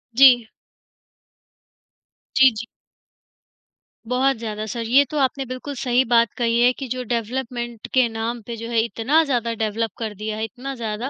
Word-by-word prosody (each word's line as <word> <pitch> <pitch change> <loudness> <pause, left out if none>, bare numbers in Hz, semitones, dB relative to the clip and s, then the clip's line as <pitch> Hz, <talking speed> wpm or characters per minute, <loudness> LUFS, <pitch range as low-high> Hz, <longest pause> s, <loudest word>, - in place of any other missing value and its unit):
जी। 245 -3 +7 1.9
जी, 265 0 +7
जी। 225 - -5 1.4
बहुत 255 +1 +1
ज़्यादा 215 -1 -5
सर, 230 +2 -4
ये 250 +5 +4
तो 305 - -4
आपने 270 0 0
बिल्कुल 255 +3 -6
सही 245 +1 +2
बात 230 -2 +4
कही 235 -1 +1
है 245 - +6
कि 270 0 -7
जो 255 +1 -3
डेवलपमेंट 240 0 -4
के 255 -2 +4
नाम 225 +1 -4
पे 235 - -5
जो 230 +1 -6
है 230 -1 +1
इतना 255 +8 +2
ज़्यादा 240 -5 -1
डेवलप 220 0 -2
कर 220 -2 -4
दिया 215 +1 -4
है 220 - -3
इतना 255 +5 -7
ज़्यादा, 230 +2 -4
235 Hz, 160 wpm, -22 LUFS, 225-255 Hz, 1.9 s, जी